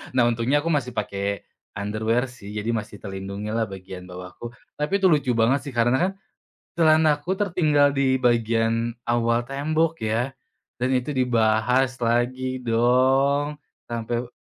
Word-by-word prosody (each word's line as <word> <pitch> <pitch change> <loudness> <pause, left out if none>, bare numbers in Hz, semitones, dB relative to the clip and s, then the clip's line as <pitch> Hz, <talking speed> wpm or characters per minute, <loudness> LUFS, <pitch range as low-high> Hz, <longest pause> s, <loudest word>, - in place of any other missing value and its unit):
Nah, 125 - +5
untungnya 120 +5 +1
aku 165 - -2
masih 135 -5 0
pakai 100 -1 -3 0.3
underwear 110 +5 -1
sih, 105 -5 -11
jadi 105 +2 -3
masih 105 -2 -5
terlindungi 100 +1 -6
lah 110 +1 0
bagian 95 -1 -9
bawah 90 0 -8
aku. 120 - -8 0.3
Tapi 150 +7 0
itu 190 - +6
lucu 145 -6 +2
banget 115 +4 +3
sih, - - -10
karena 120 +1 +3
kan - - -6 0.7
celanaku 160 +1 +3
tertinggal 155 -7 +2
di 135 -2 +2
bagian 115 -1 +1
awal 120 0 +1
tembok 155 +5 -1
ya 115 +4 -1 0.5
dan 125 +1 0
itu 125 +3 -1
dibahas 125 0 +2
lagi 125 +2 0
dong, 135 +5 +2 0.2
sampai 120 +1 -3
120 Hz, 140 wpm, -24 LUFS, 110-140 Hz, 0.7 s, itu